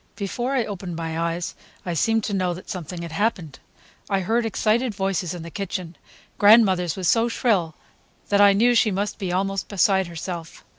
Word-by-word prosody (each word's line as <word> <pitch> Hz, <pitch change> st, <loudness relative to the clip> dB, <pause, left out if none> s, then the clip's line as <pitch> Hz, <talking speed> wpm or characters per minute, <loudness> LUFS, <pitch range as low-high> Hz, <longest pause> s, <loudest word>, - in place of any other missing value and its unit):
Before 240 Hz, +6 st, -3 dB
I 245 Hz, -4 st, +1 dB
opened 185 Hz, -4 st, -6 dB
my 165 Hz, -1 st, -4 dB
eyes, 170 Hz, +1 st, -2 dB, 0.3 s
I 175 Hz, -, -2 dB
seemed 225 Hz, +6 st, +1 dB
to 205 Hz, -, -3 dB
know 185 Hz, -2 st, 0 dB
that 185 Hz, -, -9 dB
something 175 Hz, -1 st, -6 dB
had 170 Hz, -, -7 dB
happened. 180 Hz, -, -2 dB, 0.5 s
I 195 Hz, -1 st, +1 dB
heard 225 Hz, +5 st, 0 dB
excited 220 Hz, +2 st, 0 dB
voices 190 Hz, -3 st, -1 dB
in 170 Hz, -, -7 dB
the 170 Hz, -, -9 dB
kitchen—grandmother's 190 Hz, +1 st, +1 dB
was 185 Hz, -2 st, -2 dB
so 230 Hz, +4 st, +3 dB
shrill 195 Hz, -9 st, 0 dB, 0.5 s
that 205 Hz, 0 st, +4 dB
I 200 Hz, -1 st, +7 dB
knew 235 Hz, +5 st, +4 dB
she 230 Hz, -1 st, +4 dB
must 200 Hz, +2 st, -2 dB
be 190 Hz, -4 st, -3 dB
almost 195 Hz, +1 st, -1 dB
beside 190 Hz, -1 st, +2 dB
herself. 170 Hz, -1 st, -7 dB
190 Hz, 180 wpm, -23 LUFS, 175-215 Hz, 0.5 s, I